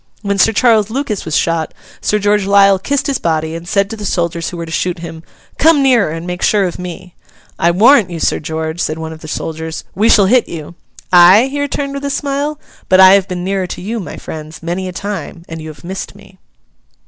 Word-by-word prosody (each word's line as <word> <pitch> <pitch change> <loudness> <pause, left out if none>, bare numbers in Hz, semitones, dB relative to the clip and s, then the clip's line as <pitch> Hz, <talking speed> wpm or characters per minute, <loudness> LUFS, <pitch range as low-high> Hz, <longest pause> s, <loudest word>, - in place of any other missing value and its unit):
When 200 -1 -1
Sir 225 - +5
Charles 220 -2 +3
Lucas 235 -4 -3
was 160 -1 0
shot, 165 -1 -1 0.3
Sir 210 - +1
George 205 -1 +1
Lisle 200 -1 +5
kissed 280 +7 -1
his 280 - -1
body, 160 -1 -1
and 165 +1 -7
said 200 +1 +1
to - - -4
the 210 - -9
soldiers 170 -3 -1
who 175 - -8
were 170 - -5
to 160 - -10
shoot 180 +2 -1
him, 165 -1 -8 0.4
'Come 315 -2 +5
nearer, 245 -9 +3
and 165 +2 -6
make 180 0 -5
sure 210 -2 +3
of 180 -2 -3
me.' 180 0 -8 0.5
'I 170 - +3
warrant 210 +3 +5
you, 170 -2 -6
Sir - - 0
George,' 160 +1 -4
said 155 - -2
one 160 0 -6
of 160 - -12
the 155 - -9
soldiers, 160 +1 -5
'we 215 +4 +2
shall 200 - +6
hit 245 +5 +3
you.' 160 0 -7 0.4
'Ay?' 185 +8 +7
he 285 0 -2
returned 280 0 -3
with 280 0 -6
a - - -1
smile, 285 +2 -2 0.3
'but 185 - +5
I 190 0 +9
have 195 -1 +3
been 180 -1 -4
nearer 190 0 -1
to - - -7
you, 220 +5 -4
my 190 - -7
friends, 155 +1 -9
many 180 +3 -3
a - - -5
time, 190 -3 -6
and 160 -1 -7
you 155 - -8
have 155 +1 -11
missed 185 +2 -6
me. 195 -2 -18
185 Hz, 230 wpm, -15 LUFS, 165-210 Hz, 0.5 s, I